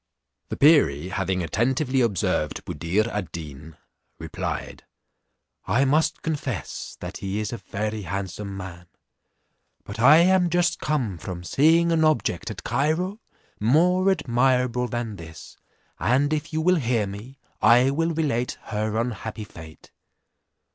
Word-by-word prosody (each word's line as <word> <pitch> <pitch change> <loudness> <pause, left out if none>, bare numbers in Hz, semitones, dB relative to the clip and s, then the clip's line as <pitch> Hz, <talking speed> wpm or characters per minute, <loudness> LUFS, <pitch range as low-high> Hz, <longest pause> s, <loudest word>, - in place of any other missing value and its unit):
The - - -4
perie 115 - +4
having 95 -1 -1
attentively 130 - 0
observed 95 -8 -1
Buddir 90 +9 -1
ad 105 -5 -4
Deen, 75 -1 -9 0.4
replied, - - -5 0.8
"I 135 +3 +3
must 150 +4 +1
confess 135 - -4
that - - -6
he 100 +1 -3
is 105 +2 -3
a - - -3
very 105 +2 -4
handsome 100 +2 -5
man, 90 -2 -9 1.0
but 100 +2 -8
I 140 +6 +8
am 180 +1 +4
just 175 +1 +1
come 120 - -1
from 90 0 -6
seeing 165 - +3
an 160 -1 +2
objets 120 - +1
at - - -7
Cairo, 160 - -1 0.4
more 180 - +3
admirable 125 -5 +1
than 120 -3 -4
this; 80 -1 -11 0.4
and 140 +6 +2
if 155 +2 -3
you 160 0 -1
will 180 +2 +3
hear 120 -6 0
me, 105 +7 -9 0.2
I 120 +4 +5
will 165 +4 0
relate 140 -7 -1
her 110 0 -2
unhappy 115 -2 -4
fate." 80 -6 -13
120 Hz, 135 wpm, -24 LUFS, 95-150 Hz, 1.0 s, I